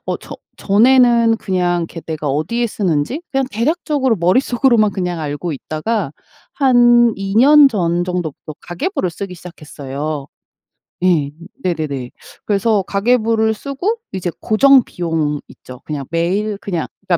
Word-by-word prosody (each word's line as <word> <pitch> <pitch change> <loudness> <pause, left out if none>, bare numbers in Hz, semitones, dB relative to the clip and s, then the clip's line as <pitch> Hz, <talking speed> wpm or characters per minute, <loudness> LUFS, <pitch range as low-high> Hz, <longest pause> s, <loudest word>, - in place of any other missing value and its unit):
어 - - -1
저 - - -10 0.2
전에는 235 +1 +4
그냥 180 -2 0
이렇게 165 0 -9
내가 155 -2 -4
어디에 160 - -1
쓰는지 195 - -2
그냥 270 -1 0
대략적으로 265 +1 0
머릿속으로만 230 +4 +2
그냥 180 -2 -3
알고 150 +3 -4
있다가 155 - -3 0.4
한 240 -3 +4
2 195 0 -4
년 285 +4 +7
전 175 -6 0
정도부터 175 -4 -5
가계부를 180 - -3
쓰기 185 +2 -7
시작했어요. 150 -4 -7 0.8
예. 165 -6 +2 0.3
네네네. 150 -8 -3 0.4
그래서 205 0 +1
가계부를 220 +2 +1
쓰고 280 - -3 0.2
이제 180 -2 -3
고정비용 175 - +2
있죠. 125 -1 -13
그냥 145 -3 -5
매일 190 +6 -1
그냥 175 -7 -3 0.2
그러니까 175 -2 +3
195 Hz, 305 characters per minute, -17 LUFS, 165-235 Hz, 0.8 s, 년